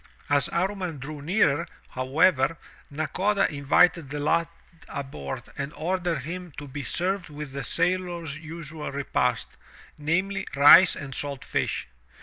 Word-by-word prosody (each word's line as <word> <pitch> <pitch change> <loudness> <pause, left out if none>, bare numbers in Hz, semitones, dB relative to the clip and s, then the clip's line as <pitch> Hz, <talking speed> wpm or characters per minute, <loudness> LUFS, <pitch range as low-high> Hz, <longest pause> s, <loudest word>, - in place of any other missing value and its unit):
As 145 -2 +3
Amman 185 -2 -1
drew 145 +2 -7
nearer, 150 -3 +2 0.2
however, 135 +3 +2 0.3
Na 155 +1 -2
koda 200 +5 +1
invited 145 +2 +3
the 145 +1 -4
lad 165 +3 +2 0.4
aboard 135 - -5 0.2
and 140 +1 -3
ordered 175 -2 -1
him 175 +4 -6
to 145 - -7
be 140 +2 -6
served 180 +4 0
with 150 -1 -7
the 140 +1 -5
sailors* 175 -3 -1
usual 155 -1 -7
repast, 125 -3 -1 0.4
namely, 190 +6 -1
rice 155 +6 +8
and 140 -2 -7
salt 140 0 -3
fish. - - -2
155 Hz, 135 wpm, -26 LUFS, 140-180 Hz, 0.4 s, rice